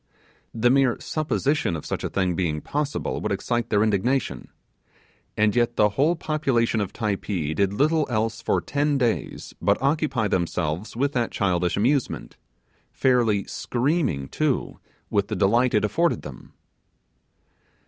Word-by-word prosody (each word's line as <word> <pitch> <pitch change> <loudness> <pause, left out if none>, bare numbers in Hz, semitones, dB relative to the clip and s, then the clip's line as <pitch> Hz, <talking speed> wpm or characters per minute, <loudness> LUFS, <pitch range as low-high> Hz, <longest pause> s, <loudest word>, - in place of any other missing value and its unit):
The 120 +2 +2
mere 135 -3 +3
supposition 150 - -1
of 80 - -6
such - - -4
a - - -2
thing 95 -2 0
being 80 -4 -1
possible 145 - -3
would - - -2
excite 120 -1 -1
their 105 -1 +3
indignation, 110 +5 0 0.9
and 105 0 +3
yet 120 0 +2
the 105 0 +4
whole 145 - +2
population 135 -9 0
of 100 - -3
Typee 100 -7 -2
did 100 +2 +1
little 150 +7 +2
else 110 -1 -1
for - - +1
ten 145 0 0
days 120 -4 -2
but - - +2
occupy 140 -5 +1
themselves 85 +1 -2
with 140 +4 +1
that 120 -4 0
childish 90 -3 0
amusement, 130 +6 0 0.6
fairly 120 -6 +2
screaming, 125 - -1
too, 150 - -1 0.3
with 100 -1 +1
the 110 - -3
delight 115 +6 +3
it 105 - +3
afforded 170 +10 +1
them. 70 -3 -11
115 Hz, 140 wpm, -24 LUFS, 100-140 Hz, 0.9 s, the